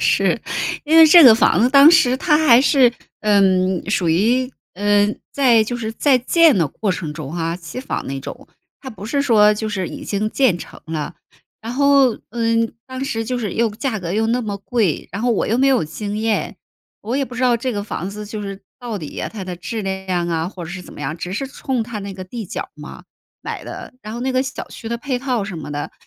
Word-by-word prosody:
是。 - - +2 0.4
因 315 +2 +3
为 325 -1 +10
这 340 +2 +9
个 230 -4 +10
房 180 -5 +3
子 240 - +4
当 280 +3 +8
时 260 -7 +4
它 300 +2 +2
还 240 -2 +7
是， 265 -3 +4 0.3
嗯， 190 -3 +2
属 180 -5 +1
于 235 +10 +2 0.2
嗯， 205 +2 +2
在 245 -5 +4
就 240 +3 -4
是 225 -2 -4
在 265 +3 +3
建 315 - +4
的 165 - +2
过 200 +8 -3
程 165 -4 -3
中 150 -2 -7
啊， 165 0 -2
期 180 +8 -8
房 265 - -4
那 135 0 -4
种。 - - -9 0.3
它 265 - -8
不 215 -3 -9
是 280 +4 0
说 210 -6 +5
就 215 +1 -3
是 190 -4 -2
已 - - -8
经 210 +1 -1
建 245 -10 +2
成 - - -11
了。 160 -2 -4 0.5
然 225 +2 -6
后， 275 -2 +3
嗯， 230 0 0
当 260 +1 -5
时 225 -4 -2
就 250 +2 -2
是 210 -6 -3
又 230 -1 +1
价 220 +1 -3
格 175 0 -4
又 220 +2 +1
那 240 +2 0
么 205 -3 -4
贵， 200 -4 -1
然 200 - -4
后 245 - +2
我 225 - 0
又 225 - +1
没 270 +1 +3
有 260 -11 +2
经 205 +6 -5
验， 220 -1 -1 0.4
我 230 +5 -3
也 275 - +1
不 250 -2 -10
知 250 - -2
道 245 -2 +4
这 255 +2 -3
个 205 -2 -3
房 190 -2 -5
子 210 +1 -7
就 210 0 -6
是 195 -1 -6 0.2
到 235 -4 -5
底 155 - -7
呀 - - -4
它 205 -4 -6
的 180 -1 -5
质 220 +6 -5
量 190 -2 -2
啊， 165 0 -1
或 185 -3 -8
者 160 - -8
是 185 0 -7
怎 - - -13
么 - - -11
样， 145 +2 -3
只 180 +2 -6
是 270 +8 -3
冲 260 -3 -3
它 225 -2 -6
那 200 0 -6
个 185 0 -8
地 225 +4 -7
角 185 - -4
儿 - - -15
嘛 - - -11 0.4
买 - - -5
的。 - - -9
然 215 +1 -7
后 235 - -5
那 260 +2 -2
个 255 0 +2
小 265 - -6
区 225 - -8
的 235 0 -3
配 255 -1 -3
套 250 -6 -1
什 195 -3 -6
么 150 -2 -7
的， 145 0 -5
220 Hz, 260 characters per minute, -19 LUFS, 190-250 Hz, 0.5 s, 为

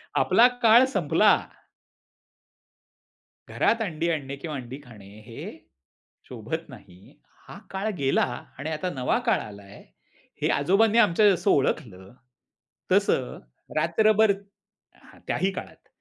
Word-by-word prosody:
आपला 240 - +5 0.2
काळ 235 +3 +7
संपला. - - +3 2.1
घरात 230 - 0
अंडी 170 -5 -2
आणणे 140 -4 -4
किंवा 150 +1 -7
अंडी 130 +1 -8
खाणे, 110 -6 -15 0.2
हे 115 -1 -9 0.7
शोभत - - -6
नाही. 90 +2 -16 0.3
हा - - -10
काळ 195 +3 -3
गेला 135 -2 +1 0.3
आणि 145 +4 -5
आता 160 +4 -3
नवा 130 - 0
काळ 235 - +2
आलाय 100 -1 -12 0.6
हे - - +1
आजोबांनी 200 +10 +2
आमच्या 210 -2 +5
जसं 185 -4 +1
ओळखलं 95 -8 -1 0.8
तसं - - +1 0.4
रात्रभर 215 +7 +3 0.6
हां, - - -20
त्याही 190 +1 0
काळात - - -10
160 Hz, 110 wpm, -25 LUFS, 130-210 Hz, 2.1 s, काळ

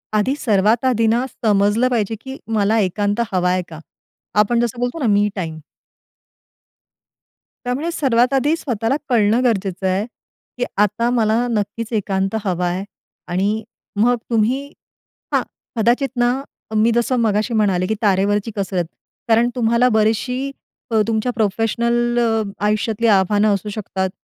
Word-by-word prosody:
आधी 245 +7 +2
सर्वात 220 0 +2
आधी 230 -3 +2
ना, 235 +3 +2
समजलं 215 0 +1
पाहिजे, 225 -3 0
की 265 0 -8 0.2
मला 210 +2 +2
एकांत 205 +2 0
हवा 180 -1 +2
आहे 185 0 +1
का? 160 -1 -9 0.6
आपण 235 +3 +3
जसं 240 0 -1
बोलतो 245 +6 -2
ना, 255 - 0
मी 205 +1 +3
टाइम. 160 -4 -4 2.1
त्यामुळे 265 +7 -1
सर्वात 255 -4 +2
आधी 290 +4 +2
स्वतःला 235 -3 -1
कळणं 230 +1 +3
गरजेचं 195 -5 0
आहे, 190 +3 0 0.5
की 245 - 0
आता 210 +4 +2
मला 230 0 +2
नक्कीच 215 +1 -2
एकांत 195 -1 -1
हवा 180 -3 -1
आहे. 180 +2 -2 0.4
आणि 200 +5 0 0.4
मग 245 +3 +4
तुम्ही 235 +4 +1 0.7
हां, - - +4 0.4
कदाचित 240 +5 +2
ना, 240 0 +3 0.4
मी 220 +2 +4
जसं 240 +2 +1
मगाशी 215 0 +1
म्हणाले, 195 -5 +2
की 220 - 0
तारेवरची 205 +1 +1
कसरत. 190 -4 -1 0.4
कारण 230 +1 +4
तुम्हाला 235 +1 +3
बरीचशी 250 +5 0 0.4
अ, 220 -1 +3
तुमच्या 225 +2 0
प्रोफेशनल 235 +3 +1 0.5
आयुष्यातली 215 +2 0
आव्हानं 205 +2 +3
असू 200 +1 -3
शकतात. 195 -3 -3
220 Hz, 135 wpm, -19 LUFS, 200-240 Hz, 2.1 s, मग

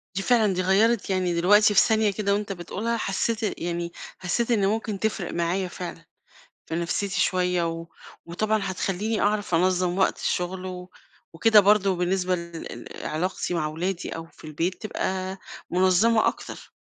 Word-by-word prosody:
دي 195 - -1
فعلًا 220 -4 +3
دي 185 - 0
غيَّرت، 200 +4 +2
يعني 185 -2 +1
دلوقتي 205 +5 +5
في - - +6
ثانية 220 -2 +3
كده 200 0 0
وأنت 205 0 -2
بتقولها 210 +6 -3
حسّيت 220 +2 -1 0.2
يعني 170 0 -3 0.3
حسّيت 230 +7 -1
إن 200 -4 +3
ممكن 215 -1 -2
تفرِق 215 -4 -2
معايا 175 +2 0
فعلًا، 175 -2 -8 0.6
في 160 - -4
نفْسيتي 180 +3 -1
شوية 180 -1 +1
و 165 0 -6 0.4
وطبعًا 215 +6 0
هتخلّيني 195 +3 -2
أعرف 205 -3 +1
أنظَّم 180 +1 +1
وقت 190 - +2
الشغل 185 +1 -2
و 180 0 -7 0.4
وكده 215 +5 +6
برضه 200 -1 +4
بالنسبة 180 +1 0
ل 170 -1 -7 0.4
لعلاقتي 180 +3 -2
مع 165 -3 0
أولادي 170 +4 -3
أو 165 - -6
في 165 - -14
البيت 165 +6 -2
تبقى 190 -2 -3 0.3
منظمة 190 +5 +4
أكتر، - - -6
185 Hz, 155 wpm, -25 LUFS, 175-210 Hz, 0.6 s, في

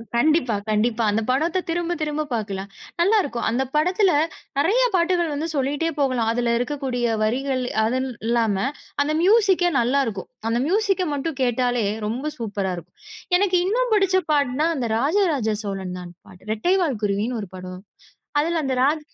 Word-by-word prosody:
கண்டிப்பா, 265 -2 +3
கண்டிப்பா. 220 +2 +1
அந்தப் 215 +1 -1
படத்த 315 +8 +1
திரும்பத் 345 0 -1
திரும்பப் 300 -1 -2
பாக்கலாம். 200 -3 -3 0.3
நல்லாருக்கும். 345 - +2
அந்தப் 255 +3 -1
படத்துல 360 +5 +3 0.5
நிறைய 395 +12 +3
பாட்டுகள் 345 -2 +2
வந்து 300 +3 -2
சொல்லிட்டே 285 +4 0
போகலாம். 255 -5 +1
அதுல 235 0 0
இருக்கக்கூடிய 250 -1 -2 0.2
வரிகள் 255 +4 0 0.2
அதுனு 260 +4 0 0.2
இல்லாம 230 -3 +2 0.5
அந்த 300 +2 -1
மியூசிக்கே 385 -2 +4
நல்லா 250 +4 +2
இருக்கும். 200 -4 -5 0.2
அந்த 230 - +1
மியூசிக்க 390 0 +1
மட்டும் 285 +1 -3
கேட்டாலே, 245 -2 +1 0.2
ரொம்ப 260 +8 -3
சூப்பரா 200 -4 -2
இருக்கும். 170 - -12 0.4
எனக்கு 375 -1 +2
இன்னும் 480 +5 0
புடிச்ச 390 -3 +3
பாட்டுனா 285 +1 +2
அந்த 260 -4 -2
ராஜா 310 - +2
ராஜா 220 -6 0
சோழன் 190 -3 -4
தான் 175 -1 -9 0.2
பாட்டு. 185 +3 -14
ரெட்டை 350 - +1
வால் 280 -11 0
குருவினு 210 +4 0
ஒரு 200 - -8
படம். 185 0 -8 0.6
அதுல 330 +1 0
அந்த 265 -1 -1
ராஜ 300 +3 +2
265 Hz, 155 wpm, -23 LUFS, 225-335 Hz, 0.6 s, மியூசிக்கே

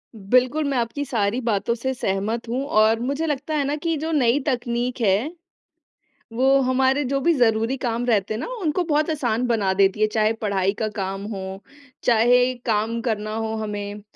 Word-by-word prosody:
बिल्कुल 255 +8 +2
मैं 270 - 0
आपकी 240 +5 -2
सारी 230 -2 0
बातों 210 +1 +1
से 260 +3 -2
सहमत 220 +2 -2
हूँ 255 +3 -1
और 220 +1 +4
मुझे 280 +6 -2
लगता 300 0 -2
है 290 - +1
ना 285 +2 -1
कि 330 -1 0
जो 320 +2 -3
नई 270 -3 +3
तकनीक 245 -1 -1
है, 215 - +2 1.0
वो 265 +3 +3
हमारे 265 +2 +2
जो 275 +2 -1
भी 335 +5 +3
ज़रूरी 230 0 +2
काम 240 -1 -2
रहते 215 -2 +1
हैं - - -3
ना, - - -4 0.2
उनको 340 +3 0
बहुत 305 0 +1
आसान 245 -5 0
बना 210 -5 +1
देती 195 +1 +2
है, 215 - +5
चाहे 215 0 +1
पढ़ाई 200 -3 0
का 220 - 0
काम 195 0 -3
हो, 190 0 -6 0.4
चाहे 245 +2 +4
काम 225 +1 0
करना 215 -2 -2
हो 225 0 -2
हमें। 205 -1 -5
235 Hz, 180 wpm, -23 LUFS, 215-265 Hz, 1.0 s, है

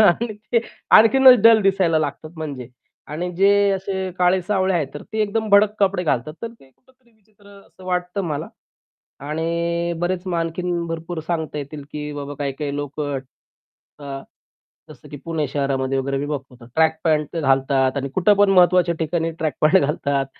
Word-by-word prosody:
आणि 215 +6 +1 0.2
ते 235 - +4 0.4
आणखीनच 250 +3 +7
डल 225 -1 +7
दिसायला 190 -4 +2
लागतात 155 +1 -4
म्हणजे. 140 -6 -6 0.4
आणि 165 +5 -4
जे 200 +1 +4
असे 190 -1 -3
काळे-सावळे 185 +1 +1
आहेत, 155 -5 0
तर 145 - -7
ते 220 - -1
एकदम 215 +1 -2
भडक 205 +1 +5
कपडे 195 -2 +1
घालतात 150 0 -1
तर 230 - -3
ते 135 - -20
कुठेतरी 255 - -31
विचित्र 210 -1 -27 0.2
असं 185 - -18
वाटतं 180 +2 -2
मला. 150 -3 -4 0.7
आणि 170 +3 -2
बरेच 180 +1 -2
आणखीन 170 +1 -2
भरपूर 165 +1 -5
सांगता 160 -3 -3
येतील, 145 0 -7
की 150 0 -5
बाबा 145 0 -6
काही-काही 140 0 -3
लोक 145 +1 -6 1.0
अ, 140 -1 -7 0.7
जसं 150 - -14
की 145 - -8
पुणे 160 -3 -2
शहरामध्ये 135 -1 -1
वगैरे 135 +1 -2
मी 145 - -3
बघतो 130 -4 -7
ट्रॅक 160 0 +3
पॅट 155 0 0
घालतात 135 -2 +1
आणि 140 0 -2
कुठे 185 +3 +4
पण 205 -1 +5
महत्त्वाच्या 180 -2 +4
ठिकाणी 165 +1 -1
ट्रॅक 155 -3 -1
पॅट 155 +5 +5
घालतात 140 -2 -1
165 Hz, 160 wpm, -21 LUFS, 145-190 Hz, 1.0 s, आणखीनच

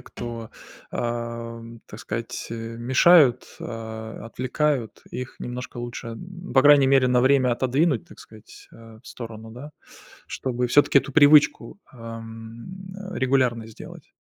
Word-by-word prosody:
кто, 115 -2 -8 0.4
ам, 115 -1 -5
так 105 - -11
сказать, 115 +2 -5
э, 115 - -4 0.2
мешают, 130 +1 +5 0.2
а, 110 -1 -7
м, - - -9
отвлекают, 130 +1 -2
их 125 0 -6
немножко 125 +1 -6
лучше, 120 0 -6
м, 175 +11 -9
по 130 - +6
крайней 145 -2 +7
мере, 135 -1 +4
на 125 0 +3
время 130 -1 +3
отодвинуть, 130 +2 +1
так - - -15
сказать, 110 0 -15
а, 115 -1 -14
в - - -20
сторону, 115 -2 -9
да? 130 +6 -10 0.6
Чтобы 125 -1 -2
всё-таки 145 +1 +5
эту 140 - -5
привычку, 150 +6 +5
а, 115 -2 -8
м, 115 +12 -10 0.2
э, - - -4
регулярной 125 -4 +1
сделать. 110 - -12
120 Hz, 145 wpm, -24 LUFS, 115-135 Hz, 0.6 s, крайней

